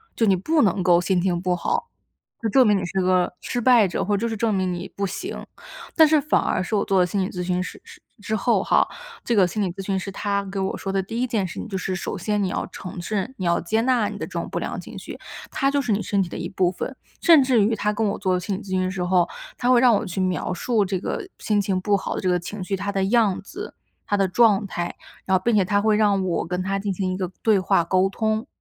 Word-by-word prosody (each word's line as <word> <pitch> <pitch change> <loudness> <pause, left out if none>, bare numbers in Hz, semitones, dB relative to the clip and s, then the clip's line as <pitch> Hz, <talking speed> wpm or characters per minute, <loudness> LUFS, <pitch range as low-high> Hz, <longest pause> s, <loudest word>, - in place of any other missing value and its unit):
就 230 - +2
你 195 -3 +4
不 310 - +1
能 190 -3 +2
够 175 -1 +5
心 180 0 +1
情 175 -2 0
不 180 -1 +1
好， 465 - -2 0.5
就 225 - 0
证 260 +1 +5
明 210 -1 +4
你 190 - -2
是 190 +2 -1
个 180 -1 +2
失 245 - -3
败 235 -5 +5
者， 175 - -2
或 205 +2 +1
就 230 +3 -1
是 225 - -3
证 225 0 +1
明 185 -2 0
你 175 +1 -5
不 200 0 -1
行。 - - -6 0.5
但 320 -2 +7
是 305 -1 +4
反 300 - +2
而 185 - 0
是 200 - -2
我 200 - +1
做 195 -1 +2
了 180 - +4
心 195 +1 -1
理 185 - -1
咨 180 - -5
询 180 0 0
师 - - -9
师 - - -14 0.2
之 215 +1 -4
后 - - +2
哈， - - +3 0.4
这 235 - +1
个 190 -3 +5
心 210 +4 -3
理 190 - 0
咨 195 0 -7
询 195 -1 0
师 195 - -6
他 200 0 -2
给 195 +1 -6
我 190 - -2
说 195 - -5
的 195 0 +1
第 225 +5 -4
一 255 - +1
件 215 -5 0
事 - - -7
情， - - -5
就 195 -3 -3
是 185 0 -3
首 - - -4
先 210 +3 -1
你 - - +1
要 - - -2
承 180 -1 -8
认， 210 +7 -3
你 185 - -4
要 170 0 +2
接 220 +6 0
纳 240 -4 +2
你 - - -7
的 - - -4
这 - - -17
种 - - -3
不 - - -4
良 - - -4
情 - - -10
绪， - - -9 0.3
它 275 - +1
就 285 0 +1
是 245 - -2
你 205 +1 +1
身 200 -2 0
体 175 - -7
的 - - -6
一 170 - -4
部 185 -2 +1
分。 260 +8 -5 0.3
甚 330 -4 +7
至 250 -5 +3
于 220 +2 +2
他 210 0 0
跟 215 0 0
我 - - -3
做 190 -2 0
了 - - 0
心 190 +2 -3
理 - - -8
咨 200 - -12
询 185 0 +1
的 185 - -1
时 185 -1 -3
候， 180 -1 +3 0.3
他 245 - 0
会 250 -1 +6
让 245 -3 +6
我 - - -1
去 185 +1 -3
描 185 -1 -1
述 210 +3 +1
这 190 0 -1
个 375 - -4
心 210 -1 +1
情 190 -1 0
不 205 0 +2
好 - - -4
的 - - -3
这 185 - 0
个 180 0 +2
情 190 +3 -6
绪， 195 +2 -2
它 200 +2 -4
的 195 -1 0
样 215 -2 +2
子、 400 - -9 0.3
它 205 - +1
的 195 -1 +2
状 210 0 +4
态， 175 -2 -4 0.3
然 190 -1 +3
后 - - -6
并 235 - +2
且 190 - +3
他 200 +2 +1
会 215 0 +3
让 200 -3 +3
我 175 -2 -1
跟 180 +1 -2
它 195 +1 -1
进 200 -1 -2
行 185 0 -2
一 - - -3
个 185 -2 -2
对 215 -3 +4
话 175 -2 +2
沟 185 +3 +2
通。 220 +3 -1
195 Hz, 315 characters per minute, -23 LUFS, 185-220 Hz, 0.5 s, 但